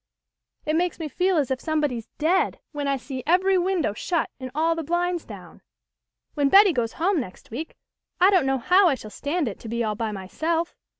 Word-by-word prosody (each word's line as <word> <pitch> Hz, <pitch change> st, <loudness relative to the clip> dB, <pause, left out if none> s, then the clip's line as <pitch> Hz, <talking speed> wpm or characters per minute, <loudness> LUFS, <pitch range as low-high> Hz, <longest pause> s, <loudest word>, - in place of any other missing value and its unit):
It 310 Hz, -, 0 dB
makes 350 Hz, +1 st, 0 dB
me 320 Hz, -, -4 dB
feel 360 Hz, +5 st, +1 dB
as 280 Hz, -4 st, 0 dB
if 260 Hz, -, -1 dB
somebody's 295 Hz, -8 st, -1 dB
dead 340 Hz, +5 st, +1 dB
when 290 Hz, -2 st, -3 dB
I 275 Hz, -1 st, +1 dB
see 260 Hz, 0 st, -6 dB
every 375 Hz, +3 st, +3 dB
win 370 Hz, 0 st, 0 dB
dow 205 Hz, -, 0 dB
shut 335 Hz, -, -2 dB
and 260 Hz, -1 st, -6 dB
all 325 Hz, +2 st, +2 dB
the 330 Hz, -, -3 dB
blinds 345 Hz, +2 st, -1 dB
down. -, -, -12 dB, 0.7 s
When 285 Hz, -2 st, +1 dB
Betty 395 Hz, 0 st, +7 dB
goes 230 Hz, -4 st, -1 dB
home 360 Hz, +1 st, +1 dB
next 185 Hz, -5 st, -8 dB
week 300 Hz, +8 st, -6 dB, 0.4 s
I 370 Hz, +3 st, +6 dB
don't 360 Hz, -8 st, +3 dB
know 270 Hz, 0 st, +2 dB
how 365 Hz, +10 st, +4 dB
I 280 Hz, -, +2 dB
shall 215 Hz, -4 st, -10 dB
stand 295 Hz, +4 st, -2 dB
it 205 Hz, -, -5 dB
to 225 Hz, -, -9 dB
be 235 Hz, +1 st, -1 dB
all 215 Hz, -1 st, -1 dB
by 220 Hz, +1 st, -3 dB
myself. 315 Hz, -, -2 dB
310 Hz, 215 wpm, -24 LUFS, 255-355 Hz, 0.7 s, Betty